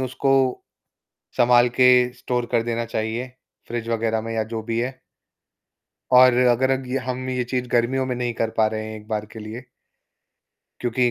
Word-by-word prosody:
उसको 130 +1 -1 1.1
संभाल 120 0 +5
के 125 - +7 0.3
स्टोर 125 -1 -2
कर 115 -2 +2
देना 115 0 -2
चाहिए, 115 +2 -3 0.4
फ्रिज 115 -1 -4
वगैरह 110 -1 0
में 115 0 -5
या 110 - 0
जो 110 - -2
भी 115 0 -2
है। 130 +2 -4 1.1
और 125 0 +7 0.2
अगर 130 +2 +1
अग 130 -1 -1 0.2
हम 130 0 -4
ये 125 -1 -1
चीज़ 125 0 -3
गर्मियों 130 +2 +1
में 125 - -2
नहीं 120 -1 -2
कर 110 - 0
पा 110 - +4
रहे 110 0 -3
हैं 110 0 -7
एक 105 0 -13
बार 105 -1 -3
के 110 - -9
लिए 110 +4 -8 1.2
क्योंकि 120 0 +1
120 Hz, 175 wpm, -22 LUFS, 115-125 Hz, 1.2 s, के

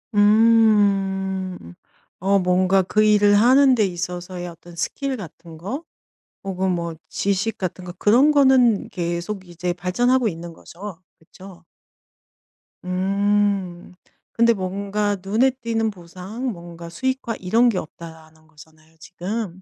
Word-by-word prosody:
음. 200 - +2 0.5
어 195 +2 +2
뭔가 185 +1 +2
그 210 +4 +1
일을 205 -1 +4
하는 260 +5 +5
데 215 -4 +2
있어서의 180 0 -5
어떤 170 0 -12
스킬 265 +9 -3
같은 165 -3 -11
거 210 - -5 0.6
혹은 190 -1 -1
뭐 170 -1 -3
지식 200 +3 -1
같은 185 0 -4
거 175 - -7
그런 250 +8 +4
거는 260 -7 +4
계속 175 +3 -4
이제 175 +1 -3
발전하고 240 +8 +1
있는 170 -1 -7
거죠? 185 +2 -10 0.2
그쵸? 180 +1 -15 1.2
음. 195 -1 0 0.4
근데 235 0 +4
뭔가 200 +1 -2
눈에 220 +8 +2
띄는 230 -3 -2
보상 190 +6 -8
뭔가 170 -2 -10
수익화 260 +5 -3
이런 230 +6 +3
게 195 - -1
없다라는 160 -1 -12
거잖아요 160 0 -19
지금. 190 +2 -6
190 Hz, 235 characters per minute, -22 LUFS, 175-215 Hz, 1.2 s, 하는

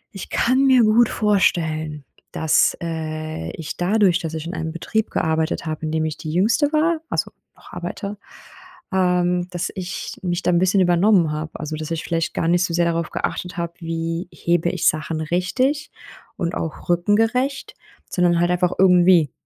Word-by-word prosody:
Ich 195 - -7
kann 260 +3 +2
mir 255 -3 +6
gut 220 +2 +4
vorstellen, 160 - 0 0.3
dass, 160 -1 +2
äh, 155 - -4
ich 160 - -6
dadurch, 190 0 +3
dass 160 -3 -5
ich 160 0 -5
in 175 - -5
einem 160 -2 -3
Betrieb 215 +6 -2
gearbeitet 160 +1 -1
habe, 155 0 -4
in - - -3
dem 160 0 0
ich 155 -1 -3
die 155 - -6
Jüngste 230 - +2
war 320 +1 +2
also - - -1 0.2
noch - - -17
arbeite, 200 0 -5 0.8
ähm, 180 -1 +1
dass 175 -1 -3
ich 180 -2 -5
mich 175 -1 -2
da - - +2
‘n 175 - +3
bisschen 185 +1 +3
übernommen 175 -1 +4
habe. 155 +1 -4
Also, 155 +1 -4
dass 155 0 -6
ich 165 -1 -2
vielleicht 165 -1 -2
gar 165 - 0
nicht 175 +1 +3
so 175 -2 -2
sehr 175 0 +2
darauf 170 -1 -1
geachtet 180 0 -4
habe, 170 0 -3
wie 165 +1 -3
hebe 170 0 0
ich - - 0
Sachen 155 +1 0
richtig 255 - 0 0.5
und 170 0 -2
auch 165 +1 -5
rückengerecht, 225 +10 +1 0.4
sondern 175 -2 +2
halt 175 +1 +2
einfach 180 0 +1
irgendwie. 180 -5 +5
175 Hz, 175 wpm, -21 LUFS, 160-190 Hz, 0.8 s, mir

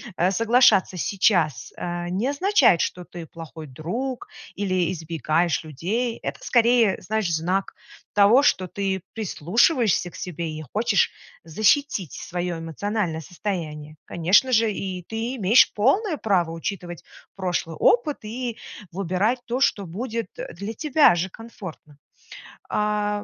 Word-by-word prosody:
э, 180 +1 +2
соглашаться 225 -2 +4
сейчас, 180 -4 +1
э, 175 0 -4
не 195 +8 -1
означает, 285 - +4
что 180 - -2
ты 170 -1 -9
плохой 160 0 -10
друг 225 - -5 0.3
или 185 -3 0
избегаешь 165 -1 -1
людей. 205 - -2
Это, - - -4
скорее, 235 -4 +4
знаешь, 215 -5 -1
знак 180 +5 -1 0.4
того, 210 +7 +6
что 185 -9 +2
ты 190 0 -2
прислушиваешься 215 - +1
к - - -15
себе, 170 -2 -5
и 155 0 -6
хочешь 210 -3 +2 0.3
защитить 210 - +1
свое 175 -1 -4
эмоциональное 165 +1 -3
состояние. 155 -5 -5
Конечно 185 +10 +3
же, 225 -2 +3
и 190 -2 -4
ты 225 +7 -4
имеешь 215 +4 +5
полное 310 - +2
право 180 -9 +1
учитывать 175 0 -5 0.3
прошлый 180 -3 -2
опыт, 245 - +3
и 235 +2 -4 0.3
выбирать 195 +7 0
то, 245 +3 -2
что 205 -7 +2
будет, 230 +4 -4
э, - - -7
для 200 +6 -6
тебя 295 - +4
же 175 +3 -1
комфортно. 185 -9 -11 0.7
А 210 -1 0
195 Hz, 130 wpm, -24 LUFS, 170-230 Hz, 0.7 s, того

